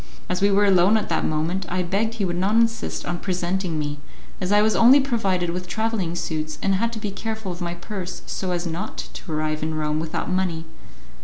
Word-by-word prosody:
As 180 0 -1
we 200 - +5
were 200 +1 +4
alone 195 +2 +5
at 215 - -2
that - - +1
moment, 165 +4 -1
I 185 +1 0
begged 210 +6 0
he 205 -4 0
would 175 -1 -1
not 190 +5 +1
insist 230 0 +1
on 175 0 -2
presenting 180 -2 -1
me, 145 -1 -3 0.4
as 185 +1 -1
I 205 0 +6
was 215 0 +3
only 250 +5 +8
provided 195 -10 +1
with 180 +1 -4
travelling 215 -5 -1
suits, 155 -2 -3
and 195 - +3
had 230 +5 +1
to 220 - -4
be 210 -1 -3
careful 220 0 -4
of 175 +1 -7
my 175 0 -2
purse 185 0 -6
so 190 - -3
as 175 -1 -1
not 170 +5 -4
to 170 - -7
arrive 155 0 -1
in 155 0 -1
Rome 155 0 0
without 160 0 -3
money. 185 -3 -1
185 Hz, 220 wpm, -24 LUFS, 170-205 Hz, 0.4 s, only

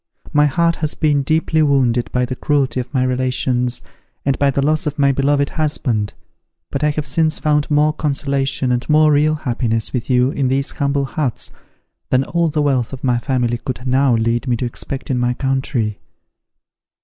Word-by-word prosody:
My 150 0 +5
heart 170 +4 +1
has 155 -1 -2
been 150 -3 +2
deeply 160 +2 +1
wounded 125 -6 +2
by 125 0 +1
the 130 +1 -4
cruelty 140 -2 0
of 125 -1 -5
my 130 -3 +1
relations, 125 -1 0 0.4
and 135 -1 +2
by 140 - +3
the 140 0 0
loss 155 0 +1
of 150 +1 -3
my 140 -1 +4
beloved 140 +1 +1
husband. 125 -9 -1 0.6
But 140 - -2
I 150 - +4
have 150 0 -2
since 160 -1 +1
found 150 -1 +1
more 150 0 +3
consolation 135 -3 -1
and 125 +3 -1
more 155 0 +5
real 150 +1 +3
happiness 120 -6 -2
with 125 -1 -3
you 125 +1 +3
in 140 -2 0
these 135 +2 0
humble 140 -1 0
huts, 135 -3 -3 0.6
than 130 +1 +3
all 170 +4 0
the 150 0 0
wealth 135 -4 0
of 135 - -8
my 125 -2 +2
family 120 -2 -1
could 125 0 -6
now 130 -1 +3
lead 115 +3 0
me 120 -2 +1
to 125 - -2
expect 130 +3 -5
in 125 - 0
my 125 0 0
country." 130 -5 -1
135 Hz, 185 wpm, -18 LUFS, 125-150 Hz, 0.6 s, My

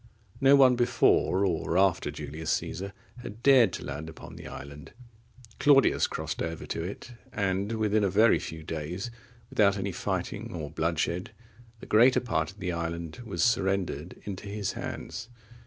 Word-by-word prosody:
No 135 +1 +7
one 130 -2 +6
before 100 -5 +3
or 85 -1 0
after 95 -2 +3
Julius 80 +2 -6
Caesar 100 +1 -3 0.3
had 115 -2 -9
dared 130 -7 +6
to - - -5
land 75 +3 -5
upon 80 - -11
the - - -9
island. 70 +1 -10 0.7
Claudius 140 -2 +5
crossed 80 -1 -4
over 80 -1 -4
to 80 - -3
it, 100 +7 -7 0.2
and 100 -1 -1
within 110 -1 +1
a 100 - +2
very 110 +5 +5
few 80 0 -7
days, 80 +8 -4 0.4
without 100 -1 +3
any 100 0 -2
fighting 90 - -3
or 75 -3 -5
bloodshed, 85 +4 -1 0.5
the - - -8
greater 120 +4 +5
part 80 -10 -1
of 100 - -13
the 90 -3 -2
island 85 +4 -4
was 95 -6 -1
surrendered 95 - 0
into 100 0 -6
his 100 -1 -2
hands. 115 +2 -6
95 Hz, 155 wpm, -28 LUFS, 80-110 Hz, 0.7 s, No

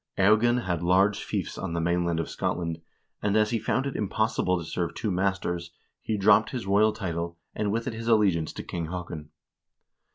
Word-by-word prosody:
Eogan 110 +5 +4
held 90 -2 -1
large 95 +4 +3
fiefs - - -3
on 90 -3 -3
the 85 - -1
mainland 85 0 +1
of 80 - -2
Scotland, 85 -1 -2 0.4
and 105 0 +2
as 105 0 +3
he 115 - +1
found 130 +5 0
it 140 - -3
impossible 105 -3 0
to 85 - -5
serve 85 0 -3
two 105 - -2
masters, 90 -2 -1 0.3
he 110 - -2
dropped 105 +2 +5
his 125 -5 -4
royal 105 +2 +4
title, 85 -3 -4 0.2
and 105 -1 -1
with 115 +2 -1
it 125 - -3
his 115 +1 -6
allegiance 100 -9 +3
to - - -6
King 85 -2 -4
Haakon. 85 -3 -6
95 Hz, 190 wpm, -27 LUFS, 85-110 Hz, 0.4 s, dropped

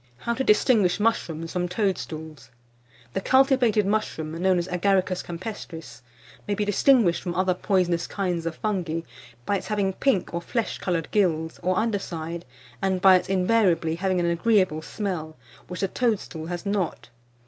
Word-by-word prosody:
HOW 235 - -2
TO 265 - -1
DISTINGUISH 210 -4 +3
MUSHROOMS 165 -7 -1
FROM 180 -1 -1
TOADSTOOLS. 160 -7 -3 0.6
The - - -1
cultivated 260 -4 +3
mushroom, 195 -7 -1
known 180 +3 +1
as 175 0 -1
Agaricus 185 0 +1
campestris, 165 - -8 0.5
may 205 - 0
be 210 - -1
distinguished 205 -2 +3
from 175 -1 -4
other 185 0 +2
poisonous 180 -2 0
kinds 180 -4 -2
of 165 - -3
fungi 175 -6 -2 0.4
by 200 - +1
its - - -7
having 200 -3 0
pink 240 -5 0
or 170 - -2
flesh 230 +6 -2
coloured 170 -3 -2
gills, 160 -6 +1
or 185 +1 0
under 220 -2 +1
side, 170 -1 -6 0.4
and 190 -1 +1
by 190 0 +7
its 185 - 0
invariably 185 -4 +2
having 185 +2 0
an 175 - +1
agreeable 170 -2 +2
smell, 165 -4 -4 0.3
which 180 - -6
the 195 - +2
toadstool 195 -8 -2
has 175 +1 -5
not. 190 - -2
185 Hz, 160 wpm, -25 LUFS, 170-205 Hz, 0.6 s, by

